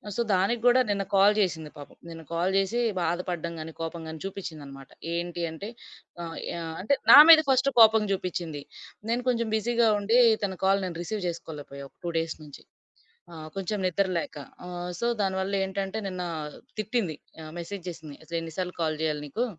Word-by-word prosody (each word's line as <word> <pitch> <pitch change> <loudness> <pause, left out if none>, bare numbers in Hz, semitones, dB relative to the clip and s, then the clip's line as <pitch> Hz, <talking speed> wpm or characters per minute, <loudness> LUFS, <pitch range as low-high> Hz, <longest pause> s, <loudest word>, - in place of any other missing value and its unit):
So 235 - 0
దానికి 195 +6 +1
గూడా 245 +1 +6
నిన్న 200 -1 0
కాల్ 200 +2 +6
జేసింది 160 -6 0
పాపం. 145 - -12
నిన్న 165 -1 -8
కాల్ 175 +3 +1
జేసి 195 +5 +1 0.2
బాధపడ్డం 170 0 -2
గానీ, 160 +1 -6
కోపం 165 +1 -4
గానీ 160 0 -7
చూపిచిందనమాట. 150 -8 -8 0.3
ఏంటి 175 0 -3
అంటే 160 +6 -7 0.6
ఆహ్, 165 -1 -6 0.2
యా 170 - -4 0.2
అంటే 250 +9 +2 0.2
నా - - +12
మీద 325 -1 +11
ఫస్ట్ 265 +1 +4
కోపం 220 -1 +7
జూపిచింది. 170 -6 -3 0.5
నేను 240 +1 +1
కొంచెం 235 -2 0
బిజీగా 235 +1 +2
ఉండి 220 +4 +2 0.3
తన 190 -1 -4
కాల్ 195 +1 +3
నేను 170 -2 -5
రిసీవ్ 210 +2 -4
జేసుకోలేపోయా 145 -4 -7
ఒక - - -47
2 170 - -1
డేస్ 165 -1 -3
నుంచి. 145 -2 -12 0.7
ఆ! - - -9 0.2
కొంచెం 195 +2 -2
నిద్ర 190 +2 +1
లేక - - -6 0.3
ఆహ్, 175 0 -5
సో 235 - +1
దానివల్ల 190 0 -1
ఏంటంటే 190 +2 -3
నిన్న 185 -1 -4 0.6
తిట్టింది. 215 -6 -1 0.3
ఆహ్, 155 - -9
మెసేజ్ 185 +2 -6
జేసింది 160 -4 -9
"అసలు 170 +1 -4
ఎన్ని 165 0 -7
సార్లు 180 -1 -2
కాల్ 155 -1 0
జేయాలి 155 -2 -1
నీకు? 225 - -1
180 Hz, 175 wpm, -27 LUFS, 165-205 Hz, 0.7 s, నా